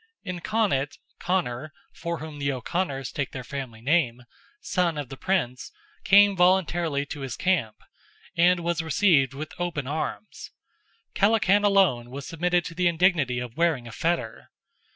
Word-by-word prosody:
In 185 -3 -5
Connaught, 175 -10 0 0.2
Conor, 155 -6 -2 0.2
(from 170 0 -4
whom 155 -2 -8
the 140 0 0
O'Conors 135 +1 -3
take 140 -3 -3
their 130 - -5
family 130 -5 -7
name), 125 -3 +1 0.4
son 175 - 0
of 145 -4 -5
the 135 - -7
Prince, 130 -7 -2 0.3
came 200 +1 +6
voluntarily 175 -5 +2
to 145 - -7
his 135 -4 -5
camp, 155 -13 0 0.6
and 175 +1 +4
was 170 0 -1
received 160 -5 +3
with 155 +3 -6
open 170 -6 -2
arms. 155 +8 -5 0.6
Kellachan 205 -1 +3
alone 190 -13 +3
was 135 +2 -7
submitted 175 +1 0
to - - -6
the 180 +1 +1
indignity 165 -7 +2
of 120 -1 -5
wearing 160 -8 +1
a - - -9
fetter. 160 -4 -2
160 Hz, 150 wpm, -26 LUFS, 135-180 Hz, 0.6 s, came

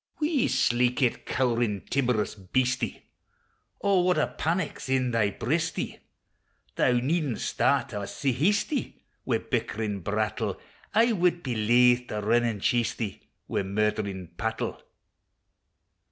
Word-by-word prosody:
Wee, 300 -4 +2
sleekit, 125 +1 +1
cowerin', 120 -5 0
timorous 125 -6 +1
beastie, 125 +6 -1 0.8
O, 200 -2 +3
what 180 -1 +2
a 150 - 0
panic 165 +1 -1
's - - -7
in 130 -2 +1
thy 115 -3 +2
breastie! 140 +11 -2 0.8
Thou 125 - +3
needna 135 +1 0
start - - +1
awa 100 -1 -3
sae 140 - -1
hasty, 200 - 0 0.2
Wi' - - +2
bickering 105 -2 -2
brattle! 105 +4 -2 0.4
I 230 +2 +5
wad 175 -4 +1
be 130 -3 -2
laith 120 +3 +4
to 105 - -3
rin 120 +3 +3
an' 110 -4 -2
chase 120 +1 +1
thee, 105 -5 -4 0.3
Wi' - - 0
murdering 100 -2 -1
pattle! 110 0 -3
120 Hz, 125 wpm, -27 LUFS, 110-150 Hz, 0.8 s, I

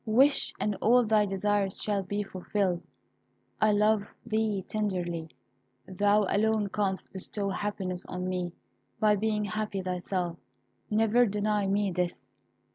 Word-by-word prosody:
Wish, 270 +6 +4
and 210 -1 0
all 245 +2 +5
thy 215 -1 +3
desires 195 0 0
shall 205 -2 0
be 205 +2 -2
fulfilled. 185 -1 -2 0.7
I 215 - +5
love 210 0 +3 0.2
thee 215 -3 0
tenderly; 175 -6 -2 0.6
thou 205 +2 +3
alone 215 0 +1
canst 195 -2 -2
bestow 200 +1 -3
happiness 195 -3 -3
on 180 0 -4
me 180 -1 -2 0.5
by 215 -1 +4
being 210 0 0
happy 205 -1 -3
thyself. 180 -1 -2 0.5
Never 225 +3 +4
deny 210 0 0
me 200 0 +1
this. 180 0 -1
205 Hz, 125 wpm, -29 LUFS, 185-215 Hz, 0.7 s, all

